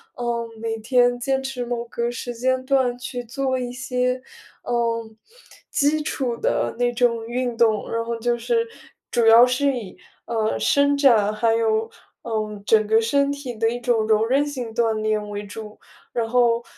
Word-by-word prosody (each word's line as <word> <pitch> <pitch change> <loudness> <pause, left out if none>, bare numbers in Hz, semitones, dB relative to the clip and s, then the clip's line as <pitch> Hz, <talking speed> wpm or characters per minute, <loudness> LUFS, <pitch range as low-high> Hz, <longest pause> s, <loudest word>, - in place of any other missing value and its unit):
嗯， 235 -1 -2
每 225 0 -2
天 245 +2 +2
坚 265 +2 0
持 265 -2 -4
某 235 -1 -3
个 235 +1 -3
时 245 0 -5
间 255 +2 0
段 260 -2 +1
去 245 0 -5
做 260 +2 -1
一 245 -1 -4
些， 250 0 -1 0.4
呃， 230 -1 -1 0.7
基 295 +2 +2
础 250 -6 -2
的 - - 0
那 245 0 +1
种 235 -2 +1
运 245 0 -2
动。 220 -2 +2
然 230 0 -1
后 235 - -2
就 240 +1 0
是， 460 - 0 0.4
主 235 -2 +1
要 225 +2 +8
是 265 +2 +1
以， 215 -6 -7 0.3
呃， 220 -2 -1
伸 285 0 +3
展， 225 -7 +4
还 225 +1 +2
有， 225 0 +1 0.3
嗯， 215 -3 -3
整 215 0 +4
个 220 +1 +3
身 280 +5 +2
体 275 -4 -6
的 225 +1 +1
一 240 - -4
种 235 -3 +1
柔 220 0 +3
韧 270 +5 +2
性 250 -6 -5
锻 230 -1 +1
炼 215 -1 -1
为 205 0 -5
主。 210 +1 -9 0.3
然 230 -2 -1
后， 240 -1 +3
240 Hz, 185 characters per minute, -23 LUFS, 225-255 Hz, 0.7 s, 要